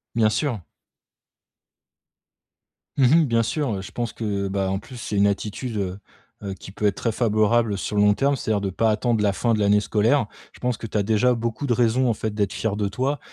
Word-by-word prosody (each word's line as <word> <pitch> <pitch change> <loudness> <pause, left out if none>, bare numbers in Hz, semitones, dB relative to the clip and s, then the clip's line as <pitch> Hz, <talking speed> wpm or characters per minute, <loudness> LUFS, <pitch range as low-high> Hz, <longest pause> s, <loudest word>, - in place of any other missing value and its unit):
Bien 110 -2 +4
sûr. 120 -1 -1 2.4
Mmh 135 - +3 0.2
mh. - - +1
Bien 115 -3 +2
sûr, 135 0 -1
heu, 95 - -4
je 95 - -10
pense 120 -2 -3
que, 100 -3 -2
bah, 95 -1 -1
en 95 - 0
plus 125 +4 -12
c'est 115 -3 -5
une 100 +1 +5
attitude, 105 +3 -3
heu 95 -1 -3 0.4
heu, 100 -1 -4
qui 95 0 -11
peut 105 - -3
être 100 - +2
très 115 - -1
favorable 110 -1 +2
sur 105 - -4
le 105 - +3
long 105 0 +5
terme, 140 +5 +1
c'est-à-dire 110 -5 -1
de 100 - -1
pas 110 +4 +1
attendre 110 0 +1
la 100 -1 +2
fin 115 +3 +1
de 110 - 0
l'année 105 0 +4
scolaire. 110 +4 +2 0.2
Je - - -18
pense 125 -2 -1
que 115 - -7
tu 105 - -3
as 100 - +2
déjà 110 +4 +3
beaucoup 115 +4 -3
de 125 - +1
raisons 125 +2 +2
en - - +2
fait 110 0 -4
d'être 100 -3 0
fière 110 -2 -2
de 105 -1 -1
toi 130 +7 -1
110 Hz, 230 wpm, -23 LUFS, 100-120 Hz, 2.4 s, une